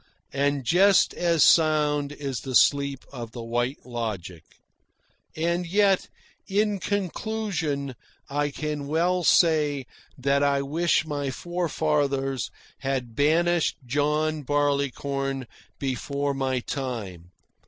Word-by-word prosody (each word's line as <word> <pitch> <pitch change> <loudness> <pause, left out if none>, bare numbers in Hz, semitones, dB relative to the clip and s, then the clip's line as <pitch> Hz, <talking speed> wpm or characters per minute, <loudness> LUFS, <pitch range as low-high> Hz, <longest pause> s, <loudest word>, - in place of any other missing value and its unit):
And 140 0 +1
just 190 +8 +4
as 170 -3 +2
sound 150 -3 +4
is 140 -3 -4
the 130 -2 -5
sleep 140 -1 +3
of 120 -3 -7
the 120 - -6
White 120 +4 -2
Logic. 105 -9 -5 0.9
And 170 +2 0
yet, 195 +1 +2 0.4
in 205 0 +1
conclusion, 185 -8 -2 0.3
I 145 +1 0
can 150 0 -4
well 175 +4 +1
say 150 -5 +3 0.3
that 140 +1 +1
I 140 -1 +2
wish 160 +3 +1
my 145 -3 -2
forefathers 145 - -1 0.3
had 130 -3 -2
banished 165 +2 +2
John 150 +4 0
Barleycorn 140 -1 -1 0.3
before 140 +1 -2
my 130 -2 -1
time. 110 - -5
145 Hz, 105 wpm, -25 LUFS, 135-160 Hz, 0.9 s, just